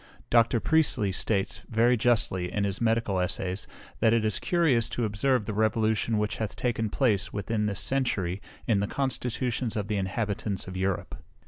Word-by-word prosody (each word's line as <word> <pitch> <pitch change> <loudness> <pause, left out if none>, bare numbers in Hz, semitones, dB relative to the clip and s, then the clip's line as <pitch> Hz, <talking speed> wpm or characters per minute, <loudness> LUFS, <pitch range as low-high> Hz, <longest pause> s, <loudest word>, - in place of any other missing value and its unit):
Dr. 115 0 +4
Priestley 145 -9 +2
states, 95 0 -1
very 120 +2 +4
justly, 110 -7 +1
in 105 - -1
his 100 +1 -2
Medical 115 -4 +1
Essays, 90 +1 -2 0.3
that 115 - +4
it 115 -2 +2
is 110 - 0
curious 160 - +2
to 120 - -1
observe 110 +3 +1
the 105 - -3
revolution 110 +1 +1
which 105 +1 -1
hath 110 -2 -3
taken 115 -3 -1
place, 105 -7 +1
within 105 +1 -1
this 100 -2 -3
century, 100 -9 -1 0.2
in 110 -4 +2
the 100 - 0
constitutions 125 -2 -2
of 105 -1 -3
the 105 - 0
inhabitants 100 0 -2
of 95 - -7
Europe. 95 -4 -2
110 Hz, 165 wpm, -28 LUFS, 100-120 Hz, 0.3 s, Dr